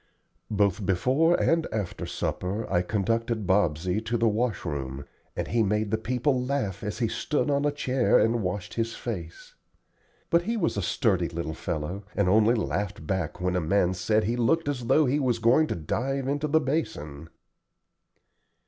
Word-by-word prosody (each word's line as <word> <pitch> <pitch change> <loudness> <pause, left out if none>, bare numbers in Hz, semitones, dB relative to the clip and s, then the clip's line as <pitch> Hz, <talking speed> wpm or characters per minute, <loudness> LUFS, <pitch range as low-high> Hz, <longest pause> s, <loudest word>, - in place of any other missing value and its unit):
Both 100 -1 +1
before 130 - +2
and 165 0 +2
after 105 -5 -3
supper 100 +5 -3
I 90 - +4
conducted 110 +3 -1
Bobsey 90 0 +1
to 120 +1 0
the 115 0 +2
wash 110 -2 0
room, 70 -3 -4 0.3
and - - -3
he 115 - +2
made 105 0 0
the 110 - +2
people 125 +3 0
laugh 125 -8 -2
as 105 0 -3
he 115 -1 +1
stood 145 +5 -1
on 140 +1 +1
a 145 - +2
chair 130 -3 +2
and 115 +1 +2
washed 90 -1 -3
his 115 0 -2
face. 85 -8 -7 0.8
But 170 - +5
he 230 +6 -2
was 170 -6 0
a 100 - -1
sturdy 90 - +1
little 85 -1 -4
fellow, 85 +4 -4
and 100 -3 +2
only 110 +5 +4
laughed 100 -6 -2
back 90 -1 -2
when 90 0 0
a 90 - +1
man 90 +2 +2
said 105 +5 +1
he 115 +5 0
looked 155 +7 +1
as 125 -5 -2
though 155 +4 +4
he 140 +3 +1
was 125 -4 +1
going 120 +7 +4
to - - -2
dive 130 - -2
into 145 +2 0
the 160 +2 +3
basin. 80 - -3
110 Hz, 175 wpm, -27 LUFS, 90-130 Hz, 0.8 s, But